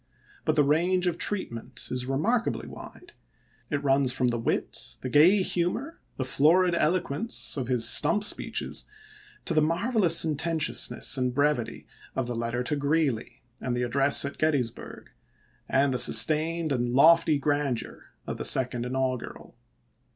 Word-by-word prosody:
But 155 - 0
the 150 - +3
range 175 +6 +1
of 175 -1 -2
treatment 130 - -3
is 125 0 -3
remarkably 220 - -1
wide; 360 - -13 0.6
it 145 -2 -3
runs 135 -2 +2
from 125 -1 0
the 120 -1 -3
wit, 115 - -4
the 130 - -5
gay 175 +8 +4
humor, 185 - -3 0.2
the 130 - -3
florid 170 +7 +2
eloquence 170 +5 -1
of 130 -4 -4
his 125 -3 +3
stump 210 - +4
speeches - - -1 0.6
to - - -2
the 155 - +2
marvelous 175 +2 +1
sententiousness 160 -2 +1
and 125 -1 -2
brevity 145 -4 -1 0.3
of 130 - -2
the 120 0 -5
letter 115 +1 -3
to 150 - -1
Greeley 140 -4 -2 0.2
and 125 -1 -3
the 125 - -1
address 140 +3 +3
at 140 - -7
Gettysburg, 140 -7 -3 0.6
and 135 0 +1
the 125 - -2
sustained 160 +1 +4
and 120 -2 -1
lofty 160 +1 +4
grandeur 145 -3 -3 0.2
of - - -6
the - - -6
Second 125 -2 +1
Inaugural. 130 -1 -5
145 Hz, 145 wpm, -26 LUFS, 125-165 Hz, 0.6 s, gay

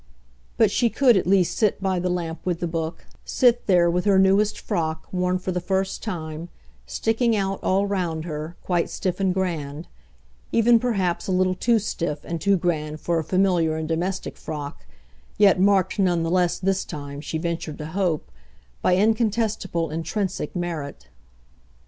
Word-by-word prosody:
but 220 -3 +4
she 235 +2 +2
could 250 -1 +4
at 185 - +1
least 185 -3 +3
sit 215 -3 +1
by 190 -2 0
the 180 +1 -1
lamp 170 -2 -3
with 175 -2 -1
the - - -1
book, 165 0 -4 0.2
sit 240 -2 +2
there 175 -3 +5
with 175 +1 +1
her 200 -2 +4
newest 195 +2 +3
frock, 160 -6 -2
worn 180 0 0
for 185 +1 -4
the 180 0 -2
first 190 +1 -1
time, 165 -5 -5 0.4
sticking 225 +1 +1
out, 195 -1 -1
all 195 +2 +2
round 175 -5 -2
her, 155 +1 -5
quite 175 -2 0
stiff 185 -1 -3
and 190 -1 +2
grand; 165 -4 -3 0.6
even 230 0 +5
perhaps 195 -8 -1
a - - -1
little 185 0 +2
too 230 +5 +2
stiff 170 -8 -3
and 170 -1 -4
too 200 -1 +3
grand 155 -3 -2
for 170 0 0
a - - -2
familiar 180 -3 +2
and 160 0 -3
domestic 180 +4 -2
frock, 150 -2 -7 0.5
yet 200 -3 +5
marked 195 +1 +3
none 175 -3 +2
the 165 - -1
less, 180 -1 +2
this 190 0 0
time, 145 -1 -7
she 160 +1 -4
ventured 165 -2 -3
to 150 - -6
hope, 165 - -1 0.5
by 180 - +3
incontestable 210 -5 0
intrinsic 175 +6 -3
merit. 170 -5 -5
180 Hz, 170 wpm, -24 LUFS, 165-195 Hz, 0.6 s, there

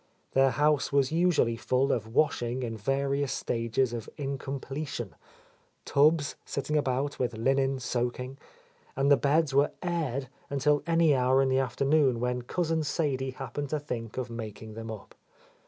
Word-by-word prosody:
Their 135 0 +4
house 150 +1 +2
was 140 -1 +2
usually 165 -8 +2
full 130 +4 +1
of 110 -3 -1
washing 125 0 0
in 115 -2 -3
various 135 +4 0
stages 115 0 0
of 115 -2 -5
incomple 140 +1 -4
tion, 115 -9 -5 0.4
— - - -38
tubs 145 +1 +3
sitting 145 +2 -3
about 140 0 0
with 120 -3 -1
linen 135 +3 +2
soaking, 125 +1 -3 0.3
— - - -32
and 140 +1 +3
the - - +9
beds 145 +1 +2
were 140 +2 +3
"aired" 150 -7 -1 0.2
until 145 +1 +2
any 165 -2 +4
hour 130 0 +3
in 135 -1 +3
the 130 0 +3
afternoon 135 -1 +2
when 125 +1 -1
Cousin 160 +5 -1
Sadie 140 -4 -1
happened 135 +2 -5
to 155 - -1
think 120 -6 -6
of 125 -2 -3
making 110 -1 -7
them 115 +1 -7
up. 110 -2 -8
135 Hz, 160 wpm, -29 LUFS, 125-145 Hz, 0.4 s, the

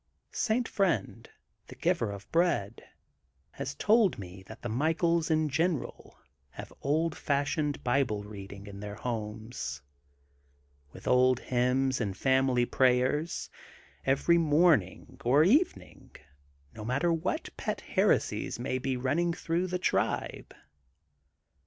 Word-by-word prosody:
i - - -47
St. 235 +1 0
Friend, 195 -6 -1 0.4
the - - -11
Giver 115 - 0
of 100 0 -9
Bread, 165 - +1 0.7
has 70 - -5
told 215 - +3
me 95 -1 -9
that 110 - -12
the - - -2
Michaels 160 +7 +1
in 155 -1 +2
general 160 +2 -2 0.3
have - - -10
old 155 +3 0
fash 140 0 0
ioned 150 -2 -2
Bible 120 -5 +1
reading 100 -1 -9
in 100 -1 -9
their 105 0 -6
homes, 110 - -5 1.1
with - - -12
old 125 0 +4
hymns 130 +1 +1
and 100 -3 -3
family 130 -2 +2
prayers, 130 +6 +1 0.5
every 155 +6 +3
morning 145 - +2
or 140 +6 +5
evening 280 - 0 0.6
no 110 - -8
matter 140 +9 +1
what 165 - -3
pet - - -3
heresies - - +1
may 130 +1 -2
be 130 0 -2
running 145 +7 +1
through 170 +2 -1
the 180 0 -2
tribe. 180 - -1
130 Hz, 125 wpm, -29 LUFS, 110-165 Hz, 1.1 s, or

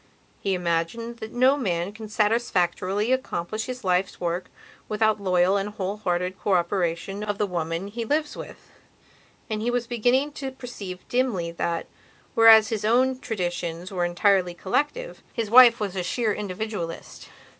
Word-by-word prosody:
He 195 -1 0
imagined 180 +7 -2
that 220 -1 -7
no 255 +3 +4
man 185 -8 -1
can 215 0 -9
satisfactorily 210 -1 +1
accomplish 220 -5 -2
his 255 0 -6
life's 185 0 0
work 175 +1 -2 0.4
without 215 -1 +1
loyal 185 0 +3
and 200 +1 -2
whole 200 -1 -4
hearted 180 -2 -2
cooperation 185 +1 0
of 205 -1 -2
the 210 - +1
woman 170 -1 -3
he 230 +3 -4
lives 300 +6 -1
with. - - -10 0.8
And 215 -1 -3
he 235 - 0
was 245 -1 0
beginning 245 +5 +1
to 275 -2 -5
perceive 210 -8 -8
dimly 235 -10 0
that, 170 0 -2 0.5
whereas 225 -1 +7
his 220 -3 -2
own 255 +4 +2
traditions 175 -6 -3
were 180 -2 -1
entirely 180 0 +2
collective, 295 - -2
his 225 -2 -3
wife 240 -1 +8
was 200 -3 -3
a 185 - -1
sheer 220 +4 0
individualist. 200 -4 -5
205 Hz, 150 wpm, -25 LUFS, 180-235 Hz, 0.8 s, wife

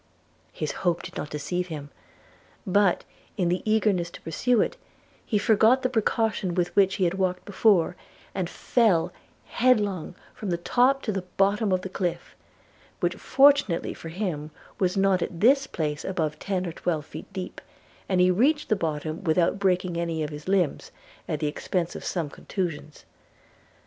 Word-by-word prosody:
His - - -3
hope 175 -2 +1
did - - -9
not 150 - -4
deceive 175 +5 -3
him; 145 -4 -7 0.7
but, 195 -1 +3 0.3
in 180 -4 +1
the 180 +1 0
eagerness 200 -6 +2
to - - -12
pursue 240 +9 +1
it, - - +1 0.5
he 215 - 0
forgot 220 +5 +4
the 255 - +2
precaution 220 -5 0
with 175 -1 -1
which 195 -1 +4
he 190 - 0
had 175 0 +2
walked 185 -1 0
before, 195 -4 +3 0.4
and 185 -3 -2
fell 185 -9 +2 0.3
headlong 205 -9 +1 0.2
from 210 - -6
the 170 - 0
top 255 +9 +2
to 215 - -1
the 195 -2 -2 0.2
bottom 200 +1 +2
of 185 -1 +2
the 190 - -5
cliff, 180 -2 -3 0.6
which - - +1
fortunately 275 -9 +3
for 165 - -9
him 165 -5 -3 0.3
was 185 0 +1
not 195 -2 +3
at 170 - -4
this 270 +6 +4
place 150 -2 -3
above 160 -5 -2
ten 190 -2 -2
or 170 - -3
twelve 160 -2 -2
feet 160 - -10
deep, 190 -2 -6 0.5
and 185 -2 +2
he 180 0 +5
reached 280 - +2
the 215 - +4
bottom, 155 -1 -3
without 170 +2 +2
breaking 185 -3 +1
any 165 -2 -1
of 150 - -4
his 150 +2 -9
limbs, 185 -6 +1 0.4
at 155 - -2
the - - 0
expence 170 +3 -2
of - - -7
some 170 -4 -2
contusions. 155 -1 -5
185 Hz, 170 wpm, -26 LUFS, 170-205 Hz, 0.7 s, he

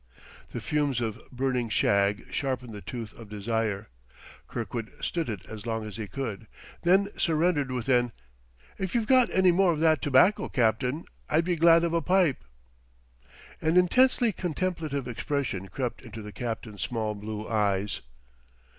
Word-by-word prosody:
The - - -4
fumes 145 -4 0
of 115 -1 -3
burning 125 -2 -1
shag 100 0 +2
sharpened 130 -4 -2
the 105 - -7
tooth 115 -2 -6
of 115 -3 -12
desire. 105 - -2 0.6
Kirkwood 115 0 -4
stood 165 -6 -2
it 105 -5 -5
as 110 0 -8
long 115 -1 -2
as 105 -1 -7
he 110 -2 -4
could, 110 0 -5 0.3
then 190 +3 +4
surrendered 160 -4 +2
with 125 -3 -3
an: 120 -2 +3 0.7
"If 190 +2 -3
you've 230 -2 +2
got 255 +1 +5
any 185 -1 +4
more 180 +1 +4
of 155 - -2
that 160 -3 +4
tobacco, 145 +9 +4
Captain, 125 +5 +1 0.2
I'd 160 +2 +2
be 175 -1 +1
glad 165 +1 +6
of 170 -1 0
a 170 - +2
pipe." 180 -3 +2 1.2
An 160 +3 +2
intensely 245 +6 +4
contemplative 165 -7 -2
expression 125 -5 -2
crept 125 +3 -4
into 115 -3 -9
the 105 - -8
captain's 110 -3 -5
small 110 -3 -1
blue 105 +1 -6
eyes. 105 -2 0
125 Hz, 155 wpm, -28 LUFS, 110-165 Hz, 1.2 s, glad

